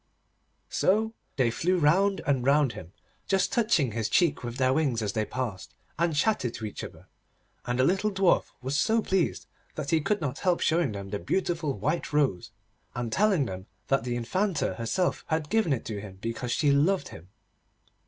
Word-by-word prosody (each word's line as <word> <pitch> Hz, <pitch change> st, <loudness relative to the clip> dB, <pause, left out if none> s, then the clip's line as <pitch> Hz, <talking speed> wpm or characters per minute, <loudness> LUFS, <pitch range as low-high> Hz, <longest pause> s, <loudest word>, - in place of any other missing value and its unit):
So 220 Hz, +3 st, +2 dB, 0.2 s
they 125 Hz, -4 st, +2 dB
flew 180 Hz, +9 st, +1 dB
round 190 Hz, +6 st, +3 dB
and 135 Hz, -4 st, +1 dB
round 140 Hz, -1 st, +3 dB
him, 90 Hz, -1 st, -10 dB, 0.4 s
just 190 Hz, -1 st, +1 dB
touching 210 Hz, -, +2 dB
his 110 Hz, 0 st, -2 dB
cheek 170 Hz, -7 st, +2 dB
with 120 Hz, +1 st, -5 dB
their 130 Hz, -1 st, +3 dB
wings 130 Hz, -7 st, +1 dB
as 100 Hz, -1 st, -2 dB
they 110 Hz, -1 st, 0 dB
passed, 105 Hz, -6 st, -5 dB, 0.2 s
and 170 Hz, -2 st, +1 dB
chattered 145 Hz, -, +1 dB
to 110 Hz, -, -5 dB
each 105 Hz, -, -6 dB
other, -, -, -10 dB, 0.6 s
and 120 Hz, 0 st, 0 dB
the 130 Hz, -, +3 dB
little 190 Hz, +8 st, +2 dB
Dwarf 195 Hz, -3 st, +3 dB, 0.2 s
was 135 Hz, +2 st, -2 dB
so 220 Hz, +9 st, +2 dB
pleased 190 Hz, -3 st, 0 dB, 0.3 s
that 150 Hz, -2 st, -4 dB
he 160 Hz, -1 st, +3 dB
could 205 Hz, +7 st, 0 dB
not 140 Hz, -5 st, -3 dB
help 180 Hz, -3 st, +1 dB
showing 165 Hz, -7 st, +1 dB
them 100 Hz, -1 st, -7 dB
the 100 Hz, -, -2 dB
beautiful 165 Hz, -, -1 dB
white 155 Hz, +5 st, -1 dB
rose, 130 Hz, -7 st, +1 dB, 0.5 s
and 120 Hz, -2 st, -3 dB
telling 195 Hz, -8 st, +3 dB
them 95 Hz, -3 st, -7 dB, 0.2 s
that 135 Hz, -3 st, +2 dB
the 120 Hz, -1 st, -2 dB
Infanta 175 Hz, -, 0 dB
herself 125 Hz, +11 st, -1 dB
had 160 Hz, -2 st, -2 dB
given 220 Hz, -7 st, +2 dB
it 130 Hz, -, -1 dB
to 105 Hz, -3 st, -4 dB
him 95 Hz, -2 st, -10 dB
because 115 Hz, +3 st, -4 dB
she 145 Hz, +1 st, +2 dB
loved 160 Hz, +8 st, +2 dB
him. 80 Hz, +3 st, -12 dB
145 Hz, 185 wpm, -27 LUFS, 115-180 Hz, 0.6 s, round